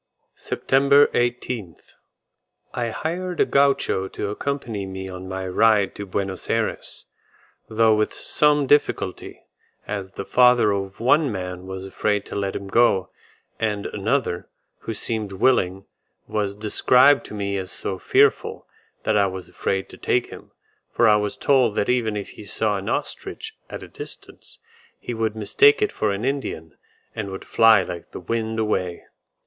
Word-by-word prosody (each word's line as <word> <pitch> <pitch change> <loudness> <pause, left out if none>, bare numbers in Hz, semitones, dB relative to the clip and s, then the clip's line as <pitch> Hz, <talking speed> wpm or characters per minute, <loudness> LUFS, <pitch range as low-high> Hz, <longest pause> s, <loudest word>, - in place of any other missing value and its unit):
SEPTEMBER 140 +2 +3
18th. 120 - -2 0.8
I 120 -1 -2
hired 175 +8 -4
a - - +5
Gaucho 140 -8 +2
to 100 +1 -4
accompany 115 -5 -3
me 95 0 -6
on 95 0 -8
my 95 0 -4
ride 105 +1 +3
to 100 - -7
Buenos 95 0 -4
Ayres, - - -2 0.6
though 110 0 +4
with 105 0 +1
some 150 -1 +2
difficulty, 135 -9 0 0.4
as 100 -2 -5
the 100 - -6
father 125 -3 +5
of 95 -1 -3
one 135 +4 +3
man 90 -2 -5
was 95 0 -6
afraid 105 +1 -1
to - - -8
let 100 -1 -2
him 100 - -5
go, 95 -3 +3 0.5
and 105 -2 -1
another, 105 -3 -1 0.3
who 115 - -5
seemed 105 -2 -3
willing, 95 -3 +1 0.4
was 100 -2 -2
described 125 +6 +4
to - - -8
me 100 -1 -2
as 95 - -6
so 95 -1 -4
fearful, - - +2 0.4
that 110 - +1
I 100 -1 +4
was 95 -1 -7
afraid 95 0 -2
to - - -12
take - - 0
him, - - -11 0.4
for 120 - +3
I 105 -1 +6
was 105 -1 -2
told 130 -6 +3
that 100 - 0
even 115 -4 +1
if 100 - -5
he - - -11
saw 105 0 -1
an 95 - -5
ostrich - - -4
at - - -7
a - - -9
distance, - - -10 0.4
he 120 - -5
would 110 -1 -1
mistake 425 - +4
it 420 - +1
for 105 - -1
an 100 +4 -3
Indian, 130 - -3 0.4
and 105 -3 -4
would 95 0 -7
fly 115 -4 +5
like 85 -1 -7
the - - -8
wind 110 +4 -2
away. 95 -5 -1
105 Hz, 160 wpm, -23 LUFS, 95-120 Hz, 0.8 s, I